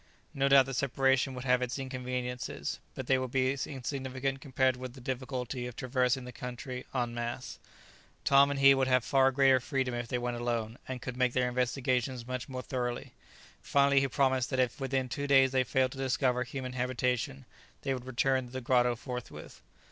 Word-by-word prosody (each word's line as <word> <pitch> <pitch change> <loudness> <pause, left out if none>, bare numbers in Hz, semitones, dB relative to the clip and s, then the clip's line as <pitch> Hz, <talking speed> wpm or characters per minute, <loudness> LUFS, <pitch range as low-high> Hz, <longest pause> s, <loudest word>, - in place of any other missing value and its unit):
No 140 0 +1
doubt 135 -1 +7
the 135 - -5
separation 135 +1 +1
would 125 - -6
have 125 -1 +3
its 125 +1 -2
inconveniences, 125 -2 -4 0.2
but 130 - -5
they 130 +1 +3
would 130 -1 -3
be 130 +1 +2
insignificant 135 0 -3
compared 130 -2 +1
with 125 -1 -7
the 135 - -12
difficulty 125 -1 -4
of 125 - -8
traversing 125 0 0
the 125 - -7
country 125 +1 -7
en 120 -3 -1
masse. 120 +2 -5 0.7
Tom 140 0 +6
and 140 -1 -2
he 135 0 +8
would 135 -1 +1
have 130 -2 +3
far 135 +1 +4
greater 135 -1 +5
freedom 130 0 -1
if 120 0 -3
they 125 - -1
went 120 0 -2
alone, 120 -1 -2
and 130 -2 -5
could 125 - -5
make 125 -1 +2
their 125 -1 +2
investigations 125 0 -1
much 130 +1 -5
more 130 -1 -5
thoroughly. 120 -2 -3 0.5
Finally 140 0 +4
he 135 - +1
promised 130 -2 +1
that 130 - -1
if 130 +2 0
within 135 -1 0
two 145 +3 -3
days 135 -2 +5
they 130 -1 +3
failed 130 +1 +1
to 135 - -9
discover 130 -1 +1
human 130 0 -6
habitation, 125 - -1 0.4
they 135 - 0
would 125 -1 -6
return 130 0 +1
to - - -15
the 130 - -4
grotto 125 -1 +2
forthwith. 125 0 -8
130 Hz, 195 wpm, -31 LUFS, 125-135 Hz, 0.7 s, he